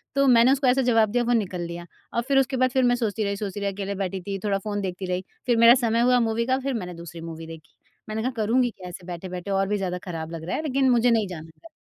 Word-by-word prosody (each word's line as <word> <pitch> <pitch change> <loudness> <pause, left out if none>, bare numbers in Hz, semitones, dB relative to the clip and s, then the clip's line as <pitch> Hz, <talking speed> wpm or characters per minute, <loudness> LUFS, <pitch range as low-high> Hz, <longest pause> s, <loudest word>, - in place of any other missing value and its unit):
तो 275 0 +3
मैंने 240 0 +6
उसको 270 -1 +2
ऐसा 260 +2 +4
जवाब 225 -3 +3
दिया 245 0 +1
वो 240 - +1
निकल 190 -6 -1
लिया, 170 0 -6 0.3
और 235 - +1
फिर 275 - +3
उसके 265 0 0
बाद 255 0 +3
फिर 260 +1 +2
मैं 245 0 +4
सोचती 225 -3 -1
रही 200 0 -2
सोचती 205 -1 -4
रही 200 0 -1
अकेले 200 0 -4
बैठी 190 -1 -3
थी 195 -1 -2
थोड़ा 200 -1 +1
फ़ोन 205 0 -3
देखती 185 0 -4
रही 180 +1 -2 0.2
फिर 240 -2 +2
मेरा 230 +1 +8
समय 230 +1 +2
हुआ 250 +1 +4
मूवी 230 +1 0
का 260 0 +2
फिर 270 0 -2
मैंने 180 -6 -4
दूसरी 170 0 -9
मूवी 165 0 -8
देखी 160 -2 -12 0.3
मैंने 215 +1 -2
कहा 255 - 0
करूँगी 240 +4 +2
क्या 185 -4 -10
ऐसे 175 0 -10
बैठे 180 +1 -6
बैठे 180 +2 -5
और 195 0 +1
भी 210 - 0
ज़्यादा 185 -2 -2
ख़राब 165 -2 -5
लग 165 -1 -6
रहा - - -1
है 310 - -3
लेकिन 270 -3 +2
मुझे 240 0 +4
नहीं 220 -3 +2
जाना 160 -3 -8
घर। 330 - -13
205 Hz, 285 wpm, -25 LUFS, 180-245 Hz, 0.3 s, मेरा